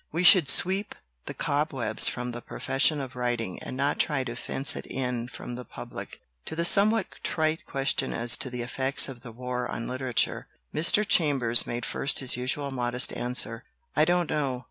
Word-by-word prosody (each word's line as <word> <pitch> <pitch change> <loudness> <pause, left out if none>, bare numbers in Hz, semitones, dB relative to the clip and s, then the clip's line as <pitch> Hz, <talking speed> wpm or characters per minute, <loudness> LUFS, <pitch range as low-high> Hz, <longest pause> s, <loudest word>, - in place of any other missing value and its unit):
We 170 +3 -1
should 175 -5 +8
sweep 190 +8 +1 0.3
the - - -6
cobwebs 145 -3 +1
from 125 0 -2
the 120 0 -7
profession 145 +5 +1
of 130 -2 -6
writing 120 -6 -3
and 130 - -6
not 140 +2 0
try 145 -5 +1
to 120 -2 -6
fence 135 +2 -1
it - - -6
in 125 -2 -3
from 125 - -8
the 125 +1 -6
public." - - -9 0.3
To - - -6
the 170 +1 0
somewhat 210 +3 +4 0.2
trite 160 0 -1
question 135 0 0
as 120 0 +2
to 130 - -1
the 125 -1 -4
effects 130 +3 0
of 130 -3 -9
the 115 - -10
war 125 +1 -4
on 115 - -4
literature, 130 -1 -1 0.3
Mr. 200 +6 +3
Chambers 135 -10 +4
made 120 0 -3
first 140 - 0
his 130 -2 +3
usual 130 +3 -1
modest 125 -1 +1
answer, 120 -1 -2 0.3
"I 155 - +4
don't 175 0 +1
know." 135 -4 -1
130 Hz, 185 wpm, -27 LUFS, 120-150 Hz, 0.3 s, should